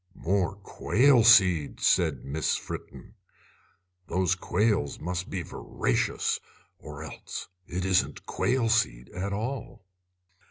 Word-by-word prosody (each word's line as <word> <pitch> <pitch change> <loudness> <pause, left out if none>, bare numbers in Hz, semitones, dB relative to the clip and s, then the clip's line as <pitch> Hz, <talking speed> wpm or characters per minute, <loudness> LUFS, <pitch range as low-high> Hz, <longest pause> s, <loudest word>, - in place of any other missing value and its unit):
"More 95 +1 0
quail 120 +5 +3
seed!" 95 -10 +5
said 80 -8 +2
Miss 75 +3 0
Fritten. - - -8 0.9
"Those 95 +1 +1
quails 100 -4 0
must 90 +2 -4
be 90 -3 -3
voracious, - - -1 0.4
or - - -9
else - - -8 0.2
it 90 +2 -3
isn't 95 -1 +1
quail 125 -2 0
seed 85 - +1
at 95 +3 -4
all." 110 -1 -5
95 Hz, 110 wpm, -27 LUFS, 85-110 Hz, 0.9 s, seed